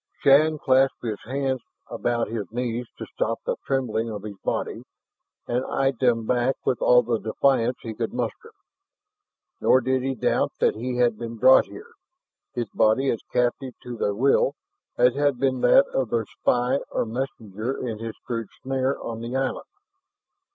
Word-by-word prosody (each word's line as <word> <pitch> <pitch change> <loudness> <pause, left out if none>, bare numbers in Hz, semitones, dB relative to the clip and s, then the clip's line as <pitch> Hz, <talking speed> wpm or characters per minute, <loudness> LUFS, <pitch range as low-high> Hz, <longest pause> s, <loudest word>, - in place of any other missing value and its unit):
Shann 155 +3 +5
clasped 135 -1 +2
his 110 -3 -3
hands 130 +1 -1 0.3
about 120 -1 -1
his 105 -4 -5
knees 120 0 -3
to - - -6
still - - -2
the - - 0
trembling 115 -4 0
of 105 -2 -6
his 105 -1 -7
body, - - -2 0.7
and 125 +2 0
eyed 135 -3 0
them 120 -3 +2
back 125 +2 +1
with 125 - 0
all 125 0 +6
the 115 -1 -1
defiance 125 +1 +1
he 115 - -5
could 110 - -3
muster. 350 - -4 1.1
Nor 130 - +5
did 130 +1 0
he 135 +1 -2
doubt - - 0
that - - +3
he 125 +3 -4
had 120 -3 +2
been 115 -1 -5
brought 130 +3 +6
here, 465 +3 -12 0.6
his 120 -2 -2
body 110 +5 +3
as 115 - -3
captive 125 +1 0
to 125 -1 -6
their 105 -2 -1
will, 135 +3 +3 0.4
as 125 0 +5
had 145 -2 +1
been 130 -1 0
that 130 +3 +6
of 130 -4 -1
their 115 -1 0
spy 125 +5 0
or - - -1
messenger 115 -1 -4
in 110 -2 -4
his 115 0 -5
crude 115 -3 -3
snare 135 0 -1
on 115 -1 -5
the 120 +2 -5
island. 135 0 -1
125 Hz, 170 wpm, -24 LUFS, 115-135 Hz, 1.1 s, all